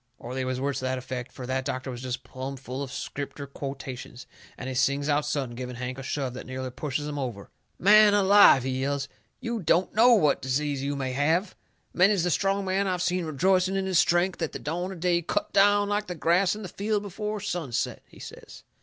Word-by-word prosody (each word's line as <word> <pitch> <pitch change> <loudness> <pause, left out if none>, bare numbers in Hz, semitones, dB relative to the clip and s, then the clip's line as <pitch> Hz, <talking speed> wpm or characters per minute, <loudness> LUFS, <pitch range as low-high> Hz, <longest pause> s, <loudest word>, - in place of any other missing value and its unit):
Or 120 - -8
they 130 0 -2
was 130 0 -2
words 140 0 -1
to 130 - -4
that 130 0 -1
effect, 125 -1 -6
fur 130 - -8
that 130 +1 -1
doctor 130 +1 -4
was 120 -1 -7
jest 130 -1 -4
plumb 130 +1 -6
full 130 +1 -6
of 135 -2 -5
Scripter 140 +1 -5
quotations. 135 -3 -7 0.3
And - - -6
he 130 - -3
sings 140 +2 +1
out 150 0 +1
sudden, 135 -5 -2
giving 125 +1 -6
Hank 125 +1 -5
a - - -5
shove 135 -1 -3
that 130 - -8
nearly 130 0 -5
pushes 145 +2 -3
him 145 -1 -4
over: 120 -7 -5 0.3
"Man 210 +2 +6
alive!" 200 -9 +7
he 130 0 -2
yells, 140 0 -1 0.3
"you 235 -1 -2
DON'T 180 0 +1
KNOW 240 +3 +6
what 150 -9 +2
disease 140 +1 -1
you 140 +1 -2
may 135 -2 -2
have! 160 +8 +1 0.4
Many's 190 0 +4
the 175 - +1
strong 195 +4 +1
man 190 +1 0
I've 180 -1 -1
seen 180 -1 0
rejoicing 185 +5 +2
in 195 0 0
his 185 -3 +2
strength 175 +1 +2
at 160 - -2
the - - -3
dawn 175 +5 -3
of 180 -4 -9
day 175 -1 +2
cut 170 - -2
down 205 +1 +4
like 205 0 -1
the 180 - -4
grass 180 +4 +2
in 215 - -8
the - - -5
field 205 +3 -2
before 210 +2 -4
sunset," 175 - -3
he - - -18
says. - - -11
145 Hz, 225 wpm, -27 LUFS, 130-190 Hz, 0.4 s, alive